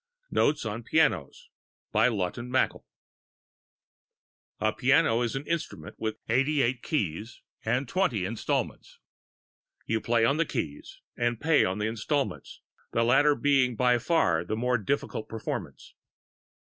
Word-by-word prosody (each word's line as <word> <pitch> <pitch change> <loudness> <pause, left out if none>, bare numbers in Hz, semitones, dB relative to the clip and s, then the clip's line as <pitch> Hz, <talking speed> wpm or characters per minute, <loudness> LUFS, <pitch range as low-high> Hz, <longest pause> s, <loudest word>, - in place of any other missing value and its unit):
NOTES 145 -4 +2
ON 110 +2 -3
PIANOS 140 - +1 0.4
A 110 +3 +4 2.7
piano 130 -3 +3
is 120 +1 -1
an 135 +2 -4
instrument 165 -1 -4
with 110 0 -3
eighty 135 +5 +2
eight 120 +1 0
keys 105 - -3 0.2
and 125 +4 0
twenty 120 - 0
installments. 110 +3 -3 0.9
You 110 -1 -1
play 115 -1 +2
on 140 +5 +2
the 165 - +2
keys 80 - -5
and 120 -1 -1
pay 160 -1 +4
on 95 +2 -1
the 105 - -1
installments 115 - -2 0.3
the 115 - +2
latter 145 +5 +4
being 135 -4 +2
by 125 +1 +3
far 115 - +2
the 90 - -3
more 125 +1 +1
difficult 110 0 -2
performance. 115 -1 -6
120 Hz, 120 wpm, -28 LUFS, 110-140 Hz, 2.7 s, A